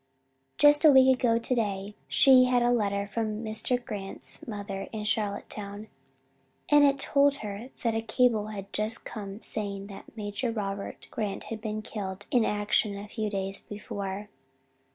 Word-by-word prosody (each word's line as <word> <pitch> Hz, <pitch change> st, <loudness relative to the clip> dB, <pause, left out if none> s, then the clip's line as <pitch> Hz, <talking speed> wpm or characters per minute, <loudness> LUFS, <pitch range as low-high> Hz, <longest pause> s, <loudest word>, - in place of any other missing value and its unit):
"Just 295 Hz, +1 st, +6 dB
a 310 Hz, -, +9 dB
week 265 Hz, -1 st, +7 dB
ago 230 Hz, -2 st, +3 dB
today 210 Hz, -4 st, -1 dB
she 260 Hz, -2 st, +6 dB
had 250 Hz, -1 st, +2 dB
a 240 Hz, -, +3 dB
letter 200 Hz, -4 st, +1 dB
from 215 Hz, +1 st, -3 dB
Mr. 220 Hz, +3 st, 0 dB
Grant's 200 Hz, -4 st, -6 dB
mother 205 Hz, -3 st, -5 dB
in 215 Hz, -1 st, -4 dB
Charlottetown. 205 Hz, 0 st, -3 dB, 0.8 s
And 295 Hz, 0 st, +6 dB
it 280 Hz, -1 st, +4 dB
told 280 Hz, 0 st, +3 dB
her 210 Hz, +5 st, -6 dB
that 230 Hz, -2 st, +1 dB
a 225 Hz, -, 0 dB
cable 225 Hz, -1 st, +2 dB
had 200 Hz, -2 st, -8 dB
just 215 Hz, +2 st, 0 dB
come 205 Hz, -1 st, -7 dB
saying 200 Hz, -2 st, -2 dB
that 205 Hz, -, -13 dB
Major 210 Hz, +3 st, -2 dB
Robert 200 Hz, -3 st, -5 dB
Grant 210 Hz, -3 st, -3 dB
had 220 Hz, -, -7 dB
been 215 Hz, -1 st, -4 dB
killed 200 Hz, -3 st, -6 dB
in 245 Hz, -3 st, +4 dB
action 205 Hz, -1 st, +1 dB
a 205 Hz, +1 st, -7 dB
few 215 Hz, 0 st, -3 dB
days 195 Hz, -1 st, +1 dB
before. 205 Hz, -1 st, -6 dB
215 Hz, 155 wpm, -28 LUFS, 200-235 Hz, 0.8 s, a